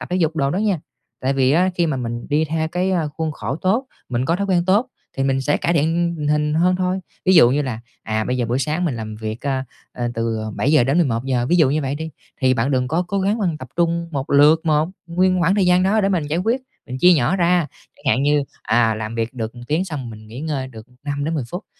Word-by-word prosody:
tập - - -7
thể 180 - +1
dục 160 -3 0
đồ 140 -2 +1
đó 180 - -1
nha. 200 -7 0 0.4
Tại 130 +1 0
vì 135 -1 +2
á 180 +4 +3
khi 170 -2 +1
mà 150 - -1
mình 120 -1 -4
đi 150 +2 +2
theo 160 +1 -1
cái, 180 +3 -1
ơ, 170 -5 0
khuôn 160 +1 -3
khổ 130 +1 -4
tốt, 220 +10 0 0.2
mình 125 +1 -1
có 170 +4 +1
thói 200 - -2
quen 180 -3 +2
tốt 205 +7 +3 0.3
thì 135 - 0
mình 135 0 +1
sẽ 145 +2 +1
cải 170 - 0
thiện 170 +2 +1
tình 150 - -2
hình 150 0 +1
hơn 180 +3 +3
thôi. 185 +1 -1 0.2
Ví 190 - +4
dụ 140 -8 +7
như 145 +3 +1
là, 120 -4 -4 0.2
à, 110 0 -1
bây 125 - -1
giờ 120 - -1
buổi 120 +3 0
sáng 150 +6 -1
mình 145 -8 -1
làm 110 -1 -6
việc, 110 +1 -5
a, 135 -1 -1 0.3
à 120 -1 -3
từ 115 -1 -1 0.2
7:00 145 -2 +3
đến 135 +6 +2
11:00, 125 -4 0
ví 175 - +3
dụ 155 -6 +4
như 155 +2 0
vậy 135 0 -2
đi, 160 +2 -5 0.3
thì 130 -1 +3
bạn 120 +3 0
đừng 125 -2 +1
có 165 +5 +1
cố 195 +2 -2
gắng 200 +4 +1
bạn 175 -7 -1
tập 130 -3 -9
trung 170 0 0
một 135 -1 -3
lượt 150 +3 +6
một 155 0 +2 0.2
nguyên 185 +2 +2
khoảng 175 +3 +3
thời 200 -3 +2
gian 180 0 +4
đó 205 +4 +3
để 195 - +2
mình 175 -6 0
giải 155 +3 -1
quyết, 230 +8 0 0.3
mình 130 0 -5
chia 180 +5 +6
nhỏ 155 +4 +2
ra, 175 -2 +2 0.3
chẳng - - -23
hạn 130 - 0
như, 145 0 +3 0.2
à, 115 -1 +2
làm 110 +1 -5
việc 115 +1 -2
được 115 -1 -4
1 120 - -10
tiếng 155 +6 0
xong 145 -9 -5
mình 110 -1 -11
nghỉ 120 +4 -8
ngơi 145 -4 -3
được 110 -2 -12 0.2
5-10 145 0 -2
phút. 180 +5 -6
150 Hz, 265 wpm, -20 LUFS, 130-175 Hz, 0.4 s, dụ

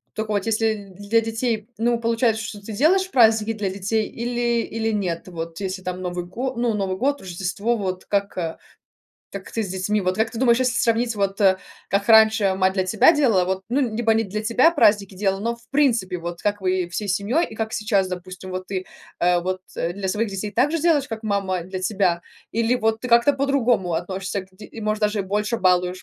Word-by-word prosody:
Тока 220 0 -3
вот 205 +1 -1
если 215 -3 -1
для 205 +3 +1
детей, 225 -1 -2
ну, 235 +1 +1
получается, 230 -1 +1
что 220 -2 -6
ты 220 - -6
делаешь 375 - +2
праздники 225 -2 +4
для 210 -3 -2
детей 200 +3 -1
или 240 0 -1
или 225 0 -2
нет, 185 -6 -2
вот 165 -2 -6
если 190 -1 -4
там 185 0 -4
Новый 175 -1 -4
го 250 +9 -4
ну, 235 -1 0
Новый 195 -2 -2
год, 280 +5 0
Рождество, 195 +5 -2
вот 185 -2 -4
как, 200 0 -1
а, 165 -2 -3 0.7
так 195 -1 -8
ты 225 - -2
с 195 - -5
детьми 190 +3 -1
вот 185 0 -1
как 220 +1 +1
ты 230 - -8
думаешь, 240 -2 +4
если 255 -2 +1
сравнить, 230 0 +1
вот, 200 0 -1
э, 190 -2 +4 0.3
как 200 +2 0
раньше 220 -3 +6
мать 190 0 +2
для 190 -1 +1
тебя 210 - +5
делала, 235 - +3
вот, 190 +1 -2
ну, 255 +4 +1 0.2
либо 225 -1 +2
не 225 0 +1
для 210 +2 -4
тебя 245 +8 +4
праздники 205 - +3
делала, 195 0 0
но, 230 +3 -2
в 235 0 -24
принципе, 235 -11 +1
вот 170 0 -6
как 205 0 0
вы 185 -2 0
всей 205 +4 -4
семьей 205 - +1
и 220 - -10
как 220 0 -3
сейчас, 210 -4 0
допустим, 185 +1 -7
вот 185 0 -5
ты, 185 -1 -3 0.4
э, 175 0 +4
вот, 185 +1 -3 0.2
э, 170 +1 -1
для 195 0 -3
своих 215 +3 0
детей 200 +1 -4
так 260 +6 +2
же 330 - 0
делаешь, 315 -5 +3
как 225 0 -6
мама 195 -3 -1
для 185 +2 -6
тебя, 185 -3 +1 0.3
или 230 +2 +1
вот 225 -2 0
ты 250 - -5
как-то 235 +3 +5
по-другому 255 -9 +1
относишься 185 +3 -3
к 185 - -17
ди 200 +3 -12
и, 225 - -10
может, 215 0 -1
даже 210 0 +1
и - - +2
больше 210 +4 -1
балуешь, 180 -2 +1
210 Hz, 220 wpm, -22 LUFS, 185-230 Hz, 0.7 s, раньше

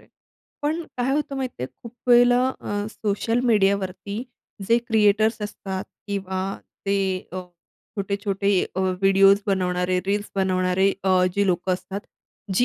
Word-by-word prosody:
आहे. - - -23 0.5
पण 310 +3 0
काय 250 +1 0
होतं 290 -1 -1
माहिती 260 - -4
आहे, - - -1 0.2
खूप 235 - -9 0.2
वेळेला 245 0 +6 0.2
अ, 205 0 -3
सोशल 225 +3 -1
मीडियावरती 200 +1 +1 0.5
जे 230 +1 +5
क्रिएटर्स 215 0 +3
असतात 195 -2 -5 0.2
किंवा 190 -2 -3 0.5
ते 200 0 +2 0.3
अ, 185 - -3 0.6
छोटे-छोटे 200 0 -1 0.2
अ, - - -3
व्हिडिओस 195 +2 +4
बनवणारे, 180 -2 +1
रील्स 205 +1 -1
बनवणारे 190 0 +2
अ, 185 -1 +4
जी 200 - +2
अ, - - +3
लोकं 185 0 +1
असतात, 190 +2 -4 0.5
जी 245 - +4
200 Hz, 140 wpm, -24 LUFS, 190-220 Hz, 0.6 s, वेळेला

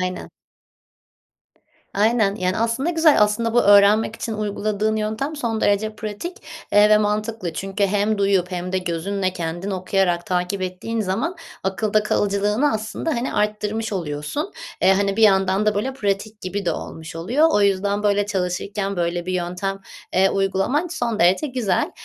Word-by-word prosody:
aynen. 185 0 -4 1.6
Aynen, 215 -1 +2
yani, 185 -2 -1
aslında 230 +7 0
güzel. 320 -6 +4
Aslında, 215 +2 +1
bu 240 - +5
öğrenmek 205 +2 +5
için 225 - -4
uyguladığın 215 0 -1
yöntem 220 +8 -2
son 230 -6 -2
derece 215 +2 +1
pratik, 220 - -6 0.3
eee, 205 +1 +6
ve 215 - +7
mantıklı 210 -3 -2
çünkü 195 +3 -1
hem 205 +2 +1
duyup 195 -2 +1
hem 180 0 -4
de 190 - +1
gözünle 185 +2 -2
kendin 175 +2 -4
okuyarak 185 -2 0
takip 180 +2 -1
ettiğin 185 +5 -3
zaman 220 - -2 0.3
akılda 210 +2 0
kalıcılığını 210 +6 +1
aslında, 220 +8 -3
hani, 240 +2 -2
arttırmış 210 +1 -1
oluyorsun. 165 - -3 0.3
Eee, 190 - +6
hani, 195 0 0
bir 225 - +4
yandan 195 0 +3
da, 210 -1 +2
böyle, 255 +6 -1
pratik 210 -2 -3
gibi 195 +2 -4
de 170 - +2
olmuş 160 0 -7
oluyor. 245 - +2
O 205 - +3
yüzden, 200 +1 +1
böyle, 205 0 +2
çalışırken 195 +1 -2
böyle 175 0 -1
bir 185 - -2
yöntem, 180 +2 -3 0.3
eee, 190 +1 +4
uygulaman 195 - 0
son 240 -10 -3
derece 185 - +3
güzel. 240 -9 -1
205 Hz, 155 wpm, -22 LUFS, 190-220 Hz, 1.6 s, ve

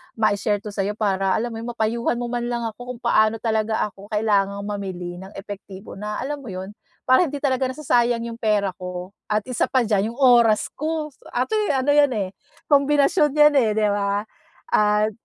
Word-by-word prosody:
mai-share 205 -1 +1
'to 210 - -6
sa'yo 200 +1 -2
para, 195 -3 +1
alam 235 +2 -2
mo 225 - -6
'yon, 230 - -6
mapayuhan 235 +2 0
mo 240 - -3
man 240 -1 -2
lang 240 -1 -2
ako 245 +3 -6
kung - - -15
paano 220 -2 +3
talaga 220 -1 0
ako 200 +1 -14
kailangang 200 -2 +1
mamili 185 -4 -5
ng 190 +1 -10
epektibo 195 0 -9
na, 210 +1 -4
alam 290 +2 -3
mo 255 - -11
'yon, 190 +2 -6 0.3
para 260 +7 +4
hindi 290 - -5
talaga 260 -2 +1
nasasayang 245 -4 +1
'yong 230 0 -6
pera 210 -3 +1
ko. 180 0 -6 0.2
At 210 -1 0
isa 245 - +1
pa 260 -2 +2
diyan, 210 -2 +1
'yong 245 - -15
oras 235 -5 +5
ko. 310 0 -3
So 270 - -20
actually 405 - 0
ano 265 +2 +2
'yan, 290 -1 +5
eh, 195 -3 -1 0.4
kombinasyon 290 +2 +4
'yan, 300 0 +6
eh, 225 - +2
'di 210 -1 +3
ba? 200 0 0 0.5
At 210 +1 +3
220 Hz, 195 wpm, -22 LUFS, 205-255 Hz, 0.5 s, yan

